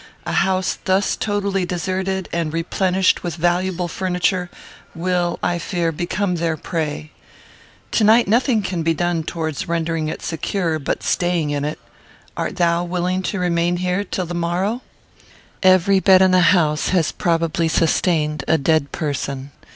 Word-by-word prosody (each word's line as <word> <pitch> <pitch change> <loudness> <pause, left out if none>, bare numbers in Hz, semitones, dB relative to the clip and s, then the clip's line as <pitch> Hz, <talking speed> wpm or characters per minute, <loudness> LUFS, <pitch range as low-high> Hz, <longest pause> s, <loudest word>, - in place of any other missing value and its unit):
A - - -3
house 190 -1 +1
thus 190 +1 +2
totally 200 -2 -1
deserted, 185 +1 -2
and 165 -2 -1
replenished 185 +3 +1
with 175 -3 -4
valuable 175 +1 0
furniture, 180 +1 -1 0.5
will, 175 0 0
I 175 -1 0
fear, 170 -2 -1
become 180 +3 -2
their 165 -1 -1
prey. 155 -2 -4 0.8
To 220 - +2
night 225 +2 +5
nothing 230 0 +2
can 185 -3 -2
be 165 0 +1
done 175 -1 0
towards 160 -2 -4
rendering 165 -1 -1
it - - -5
secure, 165 0 -2
but 140 - -3
staying 175 -4 0
in 145 -1 -1
it. 150 +1 -3 0.6
Art - - -3
thou 170 0 +2
willing 180 +1 -1
to 200 - -3
remain 175 -1 +1
here 180 +2 -1
till 185 -1 -3
the 175 - -6
morrow? 180 +7 -1 0.8
"Every 185 +1 +5
bed 190 -1 +6
in 190 - +4
the 185 0 +5
house 155 -5 +2
has 175 -4 +2
probably 165 -1 0
sustained 155 -2 +1
a 160 - +4
dead 155 0 +1
person. 140 -2 -3
175 Hz, 150 wpm, -20 LUFS, 165-185 Hz, 0.8 s, bed